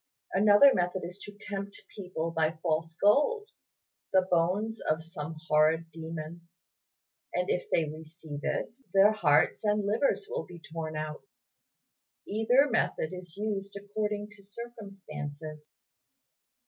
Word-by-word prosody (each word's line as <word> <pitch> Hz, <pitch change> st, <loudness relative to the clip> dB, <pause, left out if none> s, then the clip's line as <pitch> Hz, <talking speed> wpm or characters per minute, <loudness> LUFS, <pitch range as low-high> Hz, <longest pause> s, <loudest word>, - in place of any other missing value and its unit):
Another 205 Hz, +7 st, +7 dB
method 180 Hz, +1 st, 0 dB
is 180 Hz, +3 st, -8 dB
to 205 Hz, 0 st, -11 dB
tempt 200 Hz, -1 st, -5 dB, 0.2 s
people 180 Hz, -4 st, -3 dB
by 160 Hz, 0 st, +1 dB
false 160 Hz, -1 st, 0 dB
gold, 355 Hz, -, +3 dB, 0.6 s
the 190 Hz, -1 st, +5 dB
bones 195 Hz, +6 st, +1 dB
of 155 Hz, +1 st, +1 dB
some 160 Hz, -1 st, -6 dB
horrid 160 Hz, +2 st, +3 dB
demon; 165 Hz, +1 st, -7 dB, 0.9 s
and 180 Hz, +1 st, +1 dB
if 180 Hz, -, -1 dB
they 160 Hz, -2 st, +2 dB
receive 155 Hz, -1 st, -8 dB
it, 220 Hz, -, -2 dB, 0.2 s
their 195 Hz, +2 st, +8 dB
hearts 150 Hz, -6 st, +3 dB
and 210 Hz, -1 st, +2 dB
livers 230 Hz, -, +1 dB
will 485 Hz, +3 st, -4 dB
be 175 Hz, -, -11 dB
torn 160 Hz, -1 st, -4 dB
out. 155 Hz, 0 st, -4 dB, 1.1 s
Either 235 Hz, +7 st, +4 dB
method 220 Hz, -, 0 dB
is 180 Hz, -1 st, -8 dB
used 200 Hz, -1 st, -3 dB
according 210 Hz, +1 st, -3 dB
to 210 Hz, -1 st, -15 dB
circumstances." 170 Hz, -9 st, -8 dB
185 Hz, 125 wpm, -30 LUFS, 160-210 Hz, 1.1 s, their